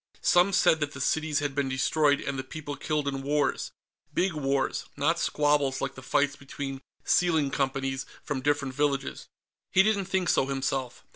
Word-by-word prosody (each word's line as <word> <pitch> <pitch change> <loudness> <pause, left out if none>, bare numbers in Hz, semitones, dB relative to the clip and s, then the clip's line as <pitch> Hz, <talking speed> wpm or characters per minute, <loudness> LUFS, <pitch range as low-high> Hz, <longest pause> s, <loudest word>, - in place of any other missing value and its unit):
Some 180 +3 +5
said 180 -3 +4
that 145 -1 -2
the 140 - -8
cities 155 +2 0
had 145 -2 -2
been 140 -1 0
destroyed 145 +2 +2
and 135 -1 -3
the - - -3
people 145 +1 -6
killed 150 -1 -2
in 135 -1 -2
wars 145 +1 0 0.4
big 190 -1 +1
wars, 135 -3 -1
not - - +2
squabbles 145 -2 +1
like 135 - -2
the 130 - -11
fights 145 +2 +1
between 135 -1 -6 0.2
sealing 160 -6 +2
companies 135 -1 -1 0.2
from 145 -3 -3
different 145 -1 0
villages. 140 -1 -1 0.4
He 190 - +5
didn't 200 -2 +1
think 190 -1 0
so, 135 - +3
himself. 135 -2 -2
145 Hz, 170 wpm, -28 LUFS, 135-150 Hz, 0.4 s, Some